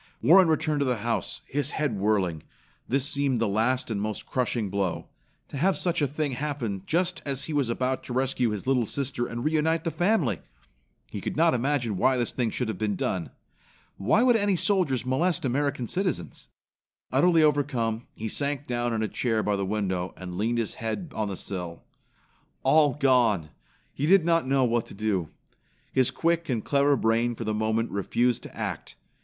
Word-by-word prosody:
Warren 180 +3 +6
returned 155 -1 +1
to 140 - +1
the 125 -2 +1
house, 115 -1 -2
his 145 +1 -2
head 145 -7 0
whirling. 95 -6 +1 0.5
This 135 +2 +1
seemed 140 -4 +1
the 115 - +1
last 115 +5 0
and 100 -2 -1
most 105 0 -4
crushing 120 -5 -1
blow. 95 -3 -2 0.4
To - - -6
have 185 +7 +2
such 175 -2 0
a 145 - +3
thing 150 +1 -2
happen 125 -7 -3
just 180 +2 0
as 135 -2 -1
he 160 - -4
was 140 -5 +1
about 130 +2 -1
to 125 - -6
rescue 130 -1 +1
his 105 -2 -4
little 130 -4 +2
sister 130 -2 -2
and 120 +3 -5
reunite 160 +1 +1
the 165 - -1
family! 175 - +1 0.7
He - - -5
could - - -4
not 165 +1 +4
imagine 125 -4 0
why 130 +7 +3
this 120 -2 0
thing 120 -3 -1
should 125 +2 -2
have 110 -4 -4
been 105 -2 0
done. 90 -1 -2 0.7
Why 210 - +3
should 245 -2 +5
any 205 -2 +2
soldiers 170 - +1
molest 145 +5 +1
American 135 -1 -1
citizens? 185 - -3 0.6
Utterly 170 -3 +4
overcome, 130 -6 0
he 110 - -4
sank 140 +4 -2
down 120 -2 -1
in 110 -1 0
a - - 0
chair 110 -1 0
by 105 - +1
the 100 -1 -2
window 95 -3 -2
and 90 -1 -7
leaned 110 +6 0
his 115 -3 -1
head 140 - -4
on 110 -1 -1
the 95 -2 -4
sill. 90 -3 -5 0.8
All 150 -4 +4
gone! 120 - +2 0.4
He 145 - -1
did 190 -1 +5
not 165 -4 +2
know 135 0 +3
what 120 -2 +1
to - - -11
do. 100 -6 -1 0.6
His 130 -1 +3
quick 170 +5 0
and 115 -4 -1
clever 140 0 +3
brain 115 +1 +1
for 115 - -5
the 110 -1 -1
moment 110 +2 0
refused 120 +5 0
to - - -12
act. - - -5
125 Hz, 190 wpm, -26 LUFS, 110-145 Hz, 0.8 s, Warren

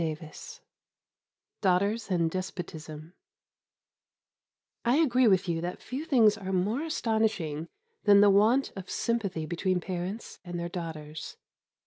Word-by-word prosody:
XII 155 -1 -3 1.3
DAUGHTERS 200 +4 +1
AND 170 -3 +1
DESPOTISM 160 -3 -6 1.7
I 240 +2 +3
agree 255 -6 +4
with 190 -2 +3
you 165 -1 -1
that 175 +1 -4
few 270 +5 -5
things 225 -8 +5
are 190 -1 -4
more 200 +8 0
astonishing 220 - -1 0.4
than 200 -1 +7
the 205 0 +7
want 220 +7 +4
of 190 -1 -8
sympathy 200 -9 -1
between 180 +3 0
parents 185 +4 -5
and 175 -1 -5
their 170 0 -3
daughters. 155 -3 -6
185 Hz, 120 wpm, -29 LUFS, 170-220 Hz, 1.7 s, than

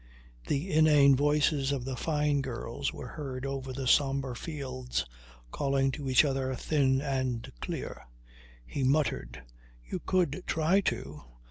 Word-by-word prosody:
The 155 +7 -1
inane 150 -3 +6
voices 145 0 +2
of 135 -3 -2
the 130 -1 -3
Fyne 150 0 +1
girls 125 +1 -3
were - - -8
heard 135 -4 -5
over 135 -1 -4
the 130 +1 -4
sombre 135 -1 +2
fields 130 - -4 0.5
calling 135 -1 +1
to 135 0 -5
each 130 +4 +6
other, 135 -2 -1
thin 135 -1 +1
and 130 -4 -2
clear. - - -5 0.6
He 135 - -3
muttered: 130 - 0 0.4
"You - - -4
could 180 -3 0
try 165 +5 +3
to. - - -7
135 Hz, 135 wpm, -30 LUFS, 130-150 Hz, 0.6 s, inane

